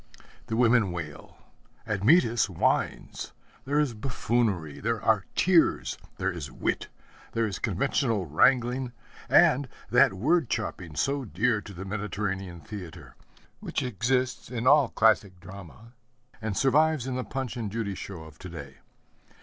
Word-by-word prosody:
The 110 - -2
women 115 -4 +4
wail, 80 -4 -7 0.5
Admetus 115 - +3
whines; 90 - -1 0.3
there 140 +2 0
is 145 -5 +1
buffoonery, 110 - -1
there 115 +1 -1
are 105 -3 +2
tears, 175 -3 +3 0.2
there 95 +1 0
is 85 -6 -6
wit, - - -2 0.5
there 115 0 +1
is 105 -2 -4
conventional 110 - 0
wrangling, 125 - +2 0.4
and 135 0 +5 0.2
that - - +5
word 145 - +2
chopping 90 -7 -3
so 140 - 0
dear 110 +3 0
to 100 - -11
the 95 +3 -7
Mediterranean 95 -3 -4
theatre, 100 -6 -9 0.4
which - - -3
exists 125 +2 -1
in 120 -1 -4
all 140 -2 +6
classic 100 -4 +2
drama 100 +5 -12 0.5
and 110 -3 -3
survives 150 0 +3
in 130 - -3
the 130 0 -2
Punch 130 -2 -4
and 110 -5 -4
Judy 110 -2 -2
show 95 -3 -7
of 80 -1 -14
to 95 - -8
day. 70 -5 -9
110 Hz, 140 wpm, -27 LUFS, 95-125 Hz, 0.5 s, all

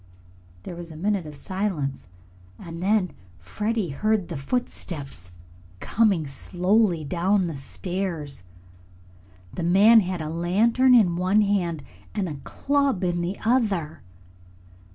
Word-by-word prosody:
There 175 - -7
was 170 0 -8
a - - -10
minute 190 0 -1
of 150 - -9
silence, 160 - -3 0.5
and 165 0 -8
then 195 -2 +2 0.3
Freddie 210 - -2
heard 210 +5 0
the 170 - -4
footsteps 140 - -4 0.5
coming 200 - +2
slowly 180 +5 +1
down 185 +5 +1
the 165 -3 -4
stairs. 160 - -5 1.1
The - - -4
man 200 +7 +6
had 185 -3 -2
a 155 - -4
lantern 215 +10 +3
in 180 -8 +4
one 185 +4 +3
hand 175 -7 0 0.3
and 200 -3 -1
a 145 -4 -7
club 280 - 0
in 175 -1 0
the 180 +3 -3
other. 205 -10 +1
180 Hz, 125 wpm, -25 LUFS, 160-210 Hz, 1.1 s, man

